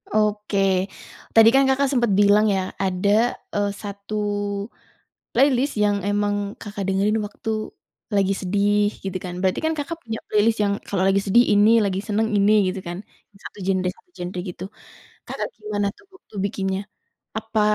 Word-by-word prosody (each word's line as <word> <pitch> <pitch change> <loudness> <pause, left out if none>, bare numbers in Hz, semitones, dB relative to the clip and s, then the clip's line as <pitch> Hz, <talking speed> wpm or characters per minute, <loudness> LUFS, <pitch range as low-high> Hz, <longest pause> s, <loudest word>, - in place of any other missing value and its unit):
Oke. 200 -3 +1 0.5
Tadi 225 0 +8
kan, 270 +2 +5
Kakak 270 +1 +2
sempet 240 -5 +2
bilang 205 +1 +5
ya? 190 -2 0
Ada, 190 0 0 0.5
eee, 205 -1 +1
satu 200 0 -7 1.2
playlist 275 0 +3
yang 205 -1 +2
emang 205 0 -1
Kakak 205 -2 -5
dengerin 200 +3 +1
waktu 210 +1 -4 0.6
lagi 195 -1 +3
sedih, 205 +2 +2 0.2
gitu 190 -1 -3
kan? 180 -1 -5
Berarti 185 -1 +1
kan 320 - +1
Kakak 310 +3 -4
punya 225 -1 -4
playlist 220 +1 +3
yang 200 -1 +1
kalau 190 -2 0
lagi 195 0 +3
sedih 225 +5 +5
ini, 210 +3 +5
lagi 190 -2 -1
seneng 220 +1 +1
ini, 200 +1 +4 0.2
gitu 195 - -6
kan? 175 0 -4 0.5
Satu - - -10
genre 185 -1 0
satu 360 - -24
genre 180 +1 -5
gitu. 180 -1 -7 0.6
Kakak - - -4
gimana 210 -1 -2
tuh - - -22
waktu 375 - -21
bikinnya? 190 -1 -2 0.6
Apa 220 0 -1
205 Hz, 155 wpm, -23 LUFS, 195-220 Hz, 1.2 s, Tadi